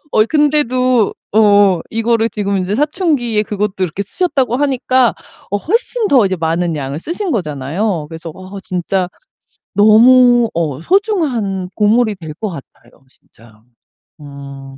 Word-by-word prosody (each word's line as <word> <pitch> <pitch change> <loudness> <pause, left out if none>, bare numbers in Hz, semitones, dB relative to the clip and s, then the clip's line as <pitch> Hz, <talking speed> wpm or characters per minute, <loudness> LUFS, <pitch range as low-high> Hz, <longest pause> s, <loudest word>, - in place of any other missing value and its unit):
어 215 - +4
근데도 255 -6 +2 0.2
어 205 -4 +4
이거를 230 0 +1
지금 200 -3 -2
이제 185 +2 -2
사춘기에 285 - 0
그것도 210 -1 -3
그렇게 185 +1 -2
쓰셨다고 260 - -1
하니까 260 -3 +1 0.4
어 205 - 0
훨씬 455 - -1
더 250 -8 +4
이제 185 -1 -2
많은 165 0 -1
양을 140 +1 -5
쓰신 355 - -4
거잖아요. 160 - -2
그래서 165 0 -8
와 185 0 -12
진짜 180 0 -2 0.7
너무 240 +3 +5
어 155 -4 -2
소중한 265 - 0
보물이 215 0 +2
될 160 -4 -9
것 215 +3 -4
같아요, 150 -7 -12 0.2
진짜. 110 -3 -23 0.6
음. 140 -1 -11
210 Hz, 275 characters per minute, -15 LUFS, 170-255 Hz, 0.7 s, 너무